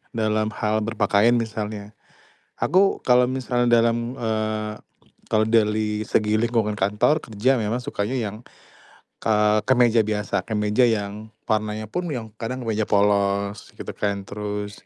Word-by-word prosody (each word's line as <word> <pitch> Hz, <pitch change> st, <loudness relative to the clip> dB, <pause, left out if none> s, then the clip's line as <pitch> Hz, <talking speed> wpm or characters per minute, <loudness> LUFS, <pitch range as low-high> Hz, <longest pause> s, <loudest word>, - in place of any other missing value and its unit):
dalam 110 Hz, -1 st, 0 dB
hal 110 Hz, 0 st, 0 dB
berpakaian 110 Hz, +1 st, +2 dB
misalnya. 110 Hz, -2 st, -4 dB, 0.7 s
Aku 190 Hz, +5 st, +2 dB
kalau 125 Hz, 0 st, +5 dB
misalnya 120 Hz, -2 st, +2 dB
dalam, 115 Hz, +1 st, 0 dB
eee, 110 Hz, -1 st, -2 dB, 0.6 s
kalau 110 Hz, 0 st, +3 dB
dali 105 Hz, -1 st, +1 dB
segi 110 Hz, 0 st, +2 dB
lingkungan 115 Hz, -2 st, +1 dB
kantor 105 Hz, +10 st, +2 dB
kerja 120 Hz, +5 st, 0 dB
memang 110 Hz, +2 st, -1 dB
sukanya 105 Hz, +2 st, -3 dB
yang, 105 Hz, -5 st, -2 dB, 0.9 s
k -, -, -2 dB
eee, 105 Hz, 0 st, +3 dB
kemeja 120 Hz, -3 st, +4 dB
biasa, 105 Hz, -3 st, -2 dB
kemeja 105 Hz, +2 st, +2 dB
yang 105 Hz, -1 st, -3 dB, 0.2 s
warnanya 110 Hz, 0 st, -1 dB
pun 180 Hz, +9 st, -3 dB
yang 115 Hz, -3 st, -5 dB
kadang 125 Hz, +3 st, -4 dB
kemeja 110 Hz, -2 st, -1 dB
polos 100 Hz, 0 st, +1 dB
gitu -, -, -9 dB
kan, 100 Hz, -1 st, -1 dB
terus 105 Hz, 0 st, -5 dB
110 Hz, 135 wpm, -23 LUFS, 105-115 Hz, 0.9 s, kalau